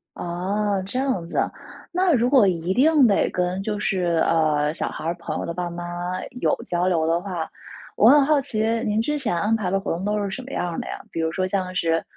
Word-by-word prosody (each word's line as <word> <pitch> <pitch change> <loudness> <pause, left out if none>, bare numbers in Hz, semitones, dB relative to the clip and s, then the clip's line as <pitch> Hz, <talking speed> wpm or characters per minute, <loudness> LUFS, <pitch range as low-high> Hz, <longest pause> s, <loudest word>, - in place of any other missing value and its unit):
哦， 195 +3 -1
这 250 +7 -3
样 260 -11 -1
子 170 - -6
啊。 - - 0 0.4
那 365 -1 +2
如 245 -2 +3
果 255 -7 +6
一 175 0 0
定 290 +2 +5
得 205 - +2
跟 180 +1 -1
就 210 0 -2
是， 175 -5 +1
呃， 155 -2 +2
小 - - -3
孩 - - -7
儿 170 +1 -1
朋 170 - -5
友 - - -3
的 170 - -4
爸 175 0 -3
妈 175 +1 -6 0.6
有 - - +2
交 175 +1 0
流 165 -3 +1
的 165 +1 +2
话， 175 -3 -4 0.5
我 220 - +6
很 290 +1 +7
好 300 0 +3
奇 260 -6 -3 0.2
您 215 +1 +1
之 295 +6 -1
前 240 -10 -1
安 205 +6 +1
排 200 -5 -2
的 195 - +2
活 195 - -3
动 180 +3 -5
都 210 0 0
是 200 - -2
什 190 - -5
么 270 - -10
样 180 - -2
儿 165 - -4
的 - - -6
呀？ - - -6
比 - - -4
如 160 0 0
说 185 +2 -1
像 185 -1 -2
是， 165 -2 +1
190 Hz, 260 characters per minute, -23 LUFS, 170-225 Hz, 0.6 s, 很